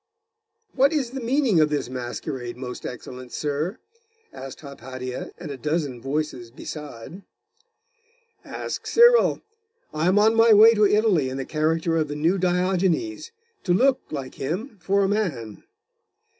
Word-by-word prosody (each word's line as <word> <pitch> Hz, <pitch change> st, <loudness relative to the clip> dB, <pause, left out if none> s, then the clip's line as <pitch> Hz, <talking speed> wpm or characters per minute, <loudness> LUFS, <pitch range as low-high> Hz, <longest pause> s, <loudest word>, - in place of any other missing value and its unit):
'What 275 Hz, +4 st, +3 dB
is 270 Hz, -6 st, -1 dB
the 270 Hz, -, -5 dB
meaning 245 Hz, -, +2 dB
of 155 Hz, -1 st, +4 dB
this 150 Hz, -4 st, -2 dB
masquerade, 125 Hz, 0 st, -5 dB
most 125 Hz, -1 st, -6 dB
excellent 125 Hz, 0 st, -9 dB
sir?' 150 Hz, -, -2 dB, 0.6 s
asked 135 Hz, -1 st, -9 dB
Hypatia 130 Hz, -3 st, -7 dB
and 145 Hz, -, -7 dB
a 140 Hz, -, -6 dB
dozen 150 Hz, -4 st, -2 dB
voices 135 Hz, -3 st, -3 dB
beside. 150 Hz, -, -9 dB, 1.2 s
'Ask -, -, -6 dB
Cyril. 475 Hz, +1 st, +5 dB, 0.5 s
I 155 Hz, +2 st, 0 dB
am 190 Hz, +2 st, +3 dB
on 215 Hz, +2 st, +5 dB
my 225 Hz, 0 st, +6 dB
way 220 Hz, +2 st, +8 dB
to 210 Hz, -2 st, +4 dB
Italy, 200 Hz, -10 st, +2 dB
in 130 Hz, -, -5 dB
the 135 Hz, -, -4 dB
character 160 Hz, +2 st, 0 dB
of 155 Hz, -1 st, 0 dB
the 145 Hz, -, -5 dB
New 165 Hz, +6 st, +1 dB
Diogenes, 185 Hz, -, 0 dB, 0.3 s
to 175 Hz, -2 st, +2 dB
look, 260 Hz, +5 st, +3 dB
like 135 Hz, -3 st, -6 dB
him, 195 Hz, -, -5 dB
for 195 Hz, +3 st, +2 dB
a -, -, +2 dB
man. 155 Hz, -, -3 dB
160 Hz, 145 wpm, -24 LUFS, 135-210 Hz, 1.2 s, way